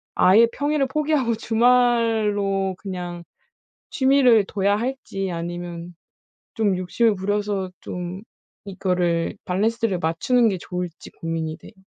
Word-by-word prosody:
아예 215 Hz, +6 st, +6 dB
평일을 290 Hz, -1 st, 0 dB
포기하고 285 Hz, -5 st, 0 dB
주말로 225 Hz, -5 st, +2 dB
그냥 175 Hz, -3 st, -6 dB, 0.7 s
취미를 265 Hz, -7 st, +4 dB
둬야 200 Hz, +1 st, +1 dB
할지 215 Hz, -6 st, -3 dB
아니면 175 Hz, 0 st, -6 dB, 0.6 s
좀 205 Hz, -4 st, +1 dB
욕심을 210 Hz, +5 st, +1 dB
부려서 200 Hz, 0 st, -2 dB
좀 180 Hz, +2 st, -6 dB, 0.4 s
이거를 180 Hz, -3 st, -1 dB
밸런스를 210 Hz, +1 st, 0 dB
맞추는 220 Hz, +9 st, +2 dB
게 190 Hz, -, -2 dB
좋을지 180 Hz, -1 st, -6 dB
고민이 160 Hz, -1 st, -4 dB
돼요. -, -, -14 dB
200 Hz, 260 characters per minute, -23 LUFS, 180-230 Hz, 0.7 s, 아예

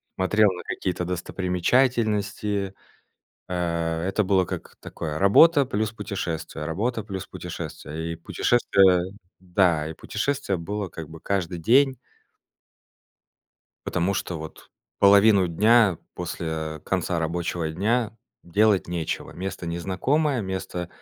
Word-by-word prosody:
смотрел 105 Hz, +2 st, +3 dB
на 90 Hz, -, -7 dB
какие-то 90 Hz, -1 st, -3 dB
достопримечательности. 100 Hz, +2 st, 0 dB, 0.8 s
Э, 85 Hz, -2 st, -1 dB
это 100 Hz, +1 st, +1 dB
было 95 Hz, -1 st, +3 dB
как -, -, -7 dB
такое: 80 Hz, -2 st, -5 dB
работа 140 Hz, -, +6 dB
плюс 110 Hz, -4 st, -1 dB
путешествие, 85 Hz, -8 st, -4 dB
работа 110 Hz, +8 st, -1 dB
плюс 95 Hz, -3 st, -6 dB
путешествие. 80 Hz, +2 st, -6 dB
И -, -, -10 dB
путешествие 95 Hz, 0 st, +3 dB, 0.3 s
да, 90 Hz, -4 st, +1 dB
и 80 Hz, -, -6 dB
путешествие 105 Hz, -, -2 dB
было, 100 Hz, +3 st, -4 dB
как 80 Hz, -2 st, -8 dB
бы, 80 Hz, -, -10 dB
каждый 95 Hz, -3 st, -2 dB
день. 130 Hz, -, +4 dB, 1.9 s
Потому 90 Hz, +2 st, 0 dB
что 90 Hz, -3 st, -3 dB
вот 80 Hz, 0 st, -10 dB, 0.3 s
половину 100 Hz, -1 st, +6 dB
дня 105 Hz, +1 st, +4 dB, 0.2 s
после, 85 Hz, -1 st, -5 dB
э, 80 Hz, -1 st, -4 dB
конца 90 Hz, 0 st, -1 dB
рабочего 85 Hz, 0 st, -2 dB
дня 110 Hz, +6 st, 0 dB, 0.3 s
делать 100 Hz, +2 st, +2 dB
нечего. 85 Hz, -2 st, -3 dB
Место 95 Hz, -1 st, -5 dB
незнакомое, 115 Hz, -, 0 dB
место 95 Hz, -3 st, -4 dB
95 Hz, 115 wpm, -25 LUFS, 85-105 Hz, 1.9 s, работа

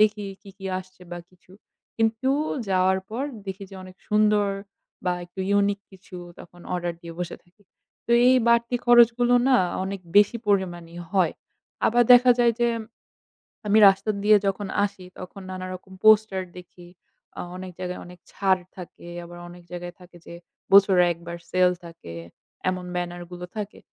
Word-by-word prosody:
দেখি 210 Hz, -1 st, +3 dB, 0.2 s
কি, 200 Hz, -, -12 dB
কি, 195 Hz, -, -11 dB
আসছে 185 Hz, -1 st, -13 dB
বা 175 Hz, -, -5 dB
কিছু। 180 Hz, 0 st, -23 dB, 0.4 s
কিন্তু 225 Hz, +4 st, +1 dB, 0.4 s
যাওয়ার 190 Hz, 0 st, +2 dB
পর 245 Hz, +6 st, -3 dB, 0.2 s
দেখি 195 Hz, +1 st, -6 dB
যে -, -, -11 dB
অনেক 185 Hz, 0 st, -13 dB
সুন্দর 210 Hz, -1 st, +3 dB, 0.6 s
বা 180 Hz, -, +1 dB
একটু 180 Hz, +2 st, -9 dB, 0.2 s
unique 200 Hz, 0 st, -1 dB
কিছু 185 Hz, 0 st, -13 dB, 0.2 s
তখন 175 Hz, +1 st, -15 dB
order 175 Hz, -1 st, -2 dB
দিয়ে 170 Hz, -1 st, -9 dB
বসে 175 Hz, -, -4 dB
থাকি। 180 Hz, +4 st, -30 dB, 0.4 s
তো 235 Hz, -, +1 dB, 0.2 s
এই 260 Hz, -, +6 dB
বাড়তি 235 Hz, +1 st, +3 dB
খরচগুলো 240 Hz, 0 st, +5 dB
না 255 Hz, -, +5 dB, 0.3 s
অনেক 195 Hz, 0 st, -5 dB, 0.2 s
বেশি 205 Hz, +3 st, +5 dB
পরিমাণেই 175 Hz, -3 st, -1 dB
হয়। 185 Hz, -5 st, +2 dB, 0.5 s
আবার 240 Hz, +2 st, +4 dB
দেখা 245 Hz, 0 st, +7 dB
যায় 235 Hz, -1 st, +4 dB
যে 240 Hz, -, +3 dB, 1.0 s
আমি 210 Hz, +2 st, +4 dB
রাস্তা 195 Hz, +2 st, +2 dB
দিয়ে 210 Hz, 0 st, +6 dB
যখন 195 Hz, +1 st, -2 dB, 0.2 s
আসি 195 Hz, -2 st, -8 dB
তখন 185 Hz, +2 st, -9 dB
নানারকম 185 Hz, 0 st, -7 dB
poster 215 Hz, -3 st, +5 dB, 0.2 s
দেখি। 175 Hz, 0 st, -13 dB, 0.5 s
আ -, -, -2 dB, 0.2 s
অনেক 185 Hz, 0 st, -7 dB
জায়গায় 180 Hz, 0 st, -4 dB
অনেক 180 Hz, 0 st, -13 dB
ছাড় 190 Hz, -2 st, +1 dB, 0.2 s
থাকে। 175 Hz, -1 st, -11 dB, 0.2 s
আবার 175 Hz, 0 st, -11 dB
অনেক 175 Hz, 0 st, -13 dB
জায়গায় 175 Hz, 0 st, -6 dB
থাকে 180 Hz, -1 st, -16 dB
যে -, -, -10 dB, 0.4 s
বছরে 195 Hz, -2 st, +7 dB
একবার 170 Hz, +1 st, -9 dB
sale 180 Hz, -1 st, +3 dB
থাকে 165 Hz, -, -11 dB, 0.6 s
এমন 185 Hz, -1 st, -4 dB
banner 175 Hz, 0 st, -4 dB
গুলো 180 Hz, 0 st, -7 dB
থাকে। 210 Hz, -1 st, -6 dB
190 Hz, 160 wpm, -24 LUFS, 180-210 Hz, 1.0 s, দেখা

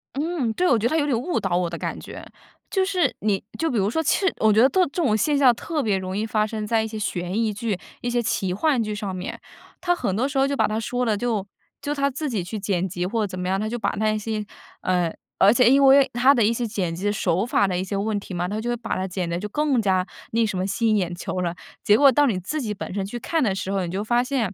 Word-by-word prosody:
嗯， 295 Hz, -5 st, -1 dB
对， 360 Hz, +7 st, +1 dB
我 240 Hz, -, +4 dB
觉 225 Hz, +2 st, +1 dB
得 -, -, -1 dB
它 320 Hz, -, +1 dB
有 290 Hz, -, +2 dB
点 275 Hz, -5 st, +1 dB
误 340 Hz, +7 st, -1 dB
导 185 Hz, -3 st, -1 dB
我 175 Hz, -1 st, +1 dB
的 170 Hz, -, -5 dB
感 -, -, -4 dB
觉。 -, -, -9 dB, 0.5 s
就 380 Hz, -2 st, +2 dB
是 370 Hz, -3 st, +1 dB
你 200 Hz, -2 st, 0 dB
就 325 Hz, 0 st, 0 dB
比 240 Hz, -, -1 dB
如 200 Hz, +1 st, +2 dB
说 320 Hz, +7 st, 0 dB
其 -, -, +2 dB
实 380 Hz, -1 st, +2 dB
我 215 Hz, -1 st, +4 dB
觉 220 Hz, -, +5 dB
得 265 Hz, -, +6 dB
特 375 Hz, -, +2 dB
这 350 Hz, -, -1 dB
种 215 Hz, -5 st, +2 dB
现 290 Hz, +7 st, +1 dB
象 260 Hz, -4 st, +6 dB
特 315 Hz, +2 st, -3 dB
别 205 Hz, -5 st, +1 dB
容 185 Hz, 0 st, -4 dB
易 210 Hz, -, -1 dB
发 215 Hz, -1 st, +1 dB
生 215 Hz, -1 st, -4 dB
在 225 Hz, 0 st, +2 dB
一 -, -, -3 dB
些 220 Hz, -1 st, -6 dB
悬 180 Hz, -3 st, -3 dB
疑 225 Hz, -1 st, +1 dB
剧、 215 Hz, -3 st, -2 dB, 0.2 s
一 245 Hz, -, -2 dB
些 240 Hz, 0 st, +1 dB
奇 190 Hz, -5 st, -1 dB
幻 265 Hz, +3 st, +1 dB
剧 210 Hz, -1 st, -2 dB
上 200 Hz, -3 st, -4 dB
面。 180 Hz, -, -6 dB, 0.4 s
它 355 Hz, -1 st, +2 dB
很 195 Hz, -, -2 dB
多 255 Hz, +5 st, +1 dB
时 280 Hz, -1 st, -4 dB
候 270 Hz, -, +4 dB
就 280 Hz, -, -1 dB
把 -, -, +2 dB
它 215 Hz, +1 st, -2 dB
说 245 Hz, +2 st, -2 dB
了， 215 Hz, -2 st, +1 dB
就 220 Hz, -4 st, -1 dB, 0.4 s
就 290 Hz, -, -2 dB
它 280 Hz, -1 st, +1 dB
自 285 Hz, +2 st, -4 dB
己 205 Hz, -7 st, -2 dB
去 210 Hz, +4 st, -5 dB
剪 190 Hz, -2 st, -1 dB
辑， 180 Hz, 0 st, -3 dB
或 220 Hz, +3 st, -1 dB
者 -, -, -1 dB
怎 185 Hz, -1 st, -7 dB
么 180 Hz, -, -3 dB
样。 190 Hz, +1 st, 0 dB
它 215 Hz, -, -2 dB
就 240 Hz, -, -3 dB
把 -, -, 0 dB
那 215 Hz, 0 st, +1 dB
些， 215 Hz, 0 st, -3 dB, 0.4 s
嗯 180 Hz, -3 st, 0 dB, 0.3 s
而 200 Hz, +2 st, +7 dB
且 240 Hz, 0 st, +5 dB
因 275 Hz, +1 st, +5 dB
为 270 Hz, 0 st, +6 dB
它 255 Hz, +4 st, +5 dB
的 235 Hz, -5 st, +2 dB
一 220 Hz, -, +3 dB
些 235 Hz, +1 st, -1 dB
剪 185 Hz, -6 st, -2 dB
辑 195 Hz, +5 st, -1 dB
手 190 Hz, 0 st, 0 dB
法 205 Hz, -, +2 dB
的 180 Hz, -1 st, -1 dB
一 -, -, -1 dB
些 200 Hz, +1 st, -4 dB
问 205 Hz, +1 st, -1 dB
题 195 Hz, -, -9 dB
嘛， 175 Hz, 0 st, -1 dB
它 210 Hz, +3 st, -3 dB
就 240 Hz, +2 st, -3 dB
会 240 Hz, -, 0 dB
把 235 Hz, -, -4 dB
它 190 Hz, +1 st, -2 dB
剪 180 Hz, -1 st, -3 dB
得 170 Hz, +1 st, -2 dB
就 210 Hz, -, -4 dB
更 275 Hz, +1 st, +1 dB
加 185 Hz, -2 st, +1 dB, 0.3 s
那 230 Hz, 0 st, +2 dB
什 195 Hz, -3 st, -3 dB
么， 185 Hz, +1 st, -1 dB
吸 225 Hz, +4 st, 0 dB
引 215 Hz, -, +3 dB
眼 175 Hz, -3 st, -1 dB
球 185 Hz, -, -4 dB
了。 175 Hz, -1 st, -2 dB, 0.3 s
结 210 Hz, -, +5 dB
果 275 Hz, +1 st, +7 dB
到 290 Hz, +1 st, +4 dB
你 220 Hz, -9 st, +1 dB
自 295 Hz, -, -3 dB
己 215 Hz, -3 st, -2 dB
本 190 Hz, -, -7 dB
身 195 Hz, -1 st, -2 dB
去 240 Hz, +5 st, -6 dB
看 325 Hz, +6 st, -1 dB
的 200 Hz, -6 st, +1 dB
时 195 Hz, 0 st, -3 dB
候， 195 Hz, -2 st, 0 dB
你 170 Hz, -, -5 dB
就 195 Hz, +2 st, -2 dB
发 240 Hz, +3 st, +2 dB
现， 250 Hz, -7 st, -1 dB
215 Hz, 325 characters per minute, -23 LUFS, 190-255 Hz, 0.5 s, 而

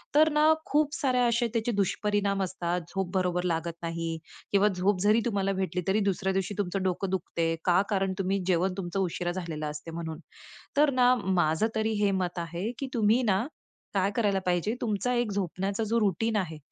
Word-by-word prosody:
तर 310 Hz, +1 st, +6 dB
ना 305 Hz, +1 st, +5 dB
खूप 295 Hz, 0 st, +1 dB
सारे 255 Hz, -3 st, +1 dB
असे 235 Hz, +1 st, +2 dB
त्याचे 230 Hz, 0 st, 0 dB
दुष्परिणाम 200 Hz, -1 st, 0 dB
असतात, 180 Hz, -1 st, -2 dB
झोप 190 Hz, -1 st, -3 dB
बरोबर 180 Hz, -1 st, +1 dB
लागत 170 Hz, -1 st, -2 dB
नाही 165 Hz, -1 st, -3 dB, 0.3 s
किंवा 200 Hz, 0 st, +4 dB
झोप 185 Hz, +1 st, +1 dB
जरी 210 Hz, +3 st, +4 dB
तुम्हाला 200 Hz, -4 st, 0 dB
भेटली 180 Hz, -1 st, -1 dB
तरी 200 Hz, +3 st, +3 dB
दुसऱ्या 190 Hz, +1 st, -2 dB
दिवशी 195 Hz, +1 st, -1 dB
तुमचं 195 Hz, -1 st, -1 dB
डोकं 185 Hz, +1 st, -1 dB
दुखते. 165 Hz, -3 st, -1 dB
का? 180 Hz, +1 st, +4 dB
कारण 195 Hz, -2 st, 0 dB
तुम्ही 195 Hz, +1 st, 0 dB
जेवण 180 Hz, +1 st, +2 dB
तुमचं 190 Hz, 0 st, -3 dB
उशिरा 175 Hz, -1 st, -1 dB
झालेलं 170 Hz, -4 st, -4 dB
असते 150 Hz, +2 st, -8 dB
म्हणून. 160 Hz, -1 st, -5 dB, 0.6 s
तर 295 Hz, +1 st, +5 dB
ना 250 Hz, 0 st, +6 dB, 0.3 s
माझं 160 Hz, +6 st, +2 dB
तरी 220 Hz, 0 st, +1 dB
हे 200 Hz, -, +3 dB
मत 175 Hz, 0 st, -3 dB
आहे, 170 Hz, +5 st, -3 dB
की 275 Hz, -, -3 dB
तुम्ही 225 Hz, +1 st, +3 dB
ना 205 Hz, 0 st, +2 dB, 0.5 s
काय 195 Hz, 0 st, +1 dB
करायला 205 Hz, -4 st, +2 dB
पाहिजे, 180 Hz, +5 st, +1 dB
तुमचा 225 Hz, +2 st, 0 dB
एक 240 Hz, -3 st, 0 dB
झोपण्याचा 195 Hz, +2 st, -2 dB
जो 230 Hz, +2 st, +1 dB
रूटीन 215 Hz, +2 st, +1 dB
आहे, 165 Hz, -5 st, -2 dB
195 Hz, 185 wpm, -28 LUFS, 175-215 Hz, 0.6 s, तर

